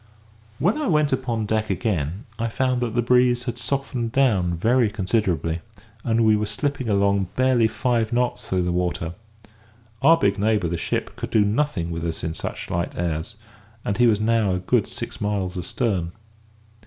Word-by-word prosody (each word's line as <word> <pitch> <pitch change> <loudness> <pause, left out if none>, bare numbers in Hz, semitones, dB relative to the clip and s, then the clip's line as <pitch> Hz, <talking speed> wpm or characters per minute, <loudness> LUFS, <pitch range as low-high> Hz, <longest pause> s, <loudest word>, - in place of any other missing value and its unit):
When 200 - +1
I 305 - -1
went 150 -4 +2
upon 120 -4 -1
deck 110 +1 -1
again, 95 - -1
I 115 - 0
found 125 +2 0
that 120 -2 -2
the 120 - +2
breeze 125 0 +3
had 120 -1 -4
softened 125 -2 -2
down 100 -11 +2
very 120 +5 +3
considerably, 95 -6 0 0.4
and 115 -1 +2
we 110 -1 +5
were 105 0 -1
slipping 130 +3 -2
along 100 -1 +2
barely 130 -3 +3
five 115 0 0
knots 125 0 -1
through 90 -1 +1
the 90 - 0
water. 85 -2 -1 0.9
Our 165 +1 +6
big 100 -9 +1
neighbour, 105 -4 +1
the 85 - -1
ship, 85 - -2
could - - -5
do 105 -2 +3
nothing 105 - 0
with 85 0 -4
us 85 -1 -3
in 80 - -2
such - - -6
light 85 0 -1
airs, 85 +4 -2 0.5
and 100 +3 -1
he 120 - +6
was 105 -3 +3
now 110 -3 +2
a 90 - -1
good 90 - +1
six - - -6
miles 100 -3 -1
astern. 90 -2 -2
110 Hz, 180 wpm, -23 LUFS, 90-125 Hz, 0.9 s, Our